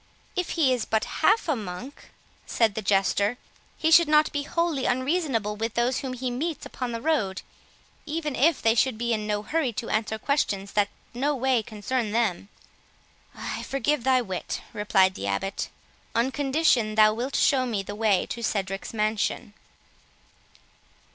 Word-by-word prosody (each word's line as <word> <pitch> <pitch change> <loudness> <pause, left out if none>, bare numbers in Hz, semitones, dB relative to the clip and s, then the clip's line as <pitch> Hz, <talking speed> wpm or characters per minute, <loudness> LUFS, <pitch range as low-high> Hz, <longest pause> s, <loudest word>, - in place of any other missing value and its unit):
"If 365 -1 -1
he 275 -6 +4
is 245 -3 -1
but 220 -1 0 0.2
half 445 -3 +4
a 310 - +2
monk," 215 +5 -8 0.4
said 225 -3 +2
the 220 - -3
Jester, 200 +3 +2 0.4
"he 320 - +1
should 335 0 +7
not 300 0 +4
be 290 - -1
wholly 335 -2 -1
unreasonable 255 - 0
with 225 +2 -3
those 245 +2 +1
whom 265 -2 -4
he 255 0 -3
meets 305 +6 -3
upon 250 -2 -4
the 230 - -3
road, 215 -12 0 0.6
even 300 -2 -2
if 315 +3 +2
they 225 - +5
should 240 0 +2
be 235 +1 0
in 215 -1 -2
no 210 0 -1
hurry 300 +1 0
to 230 +2 -4
answer 220 0 0
questions 200 -7 -1
that 205 -1 +2 0.2
no 280 +4 0
way 260 -2 +2
concern 215 +1 -3
them." 210 -4 0 0.9
"I - - -5
forgive 275 -1 -1
thy 260 -1 +3
wit," 190 -4 -4
replied 195 -2 +3
the 100 - -5
Abbot, 100 - -2 0.5
"on 240 +3 +2
condition 265 -6 +2
thou 215 0 +6
wilt 250 +5 -3
show 260 -2 +3
me 210 -5 -2
the 205 - -6
way 210 -3 +2
to 235 - -4
Cedric's 195 -1 -3
mansion." 215 -1 -1
235 Hz, 165 wpm, -26 LUFS, 210-275 Hz, 0.9 s, should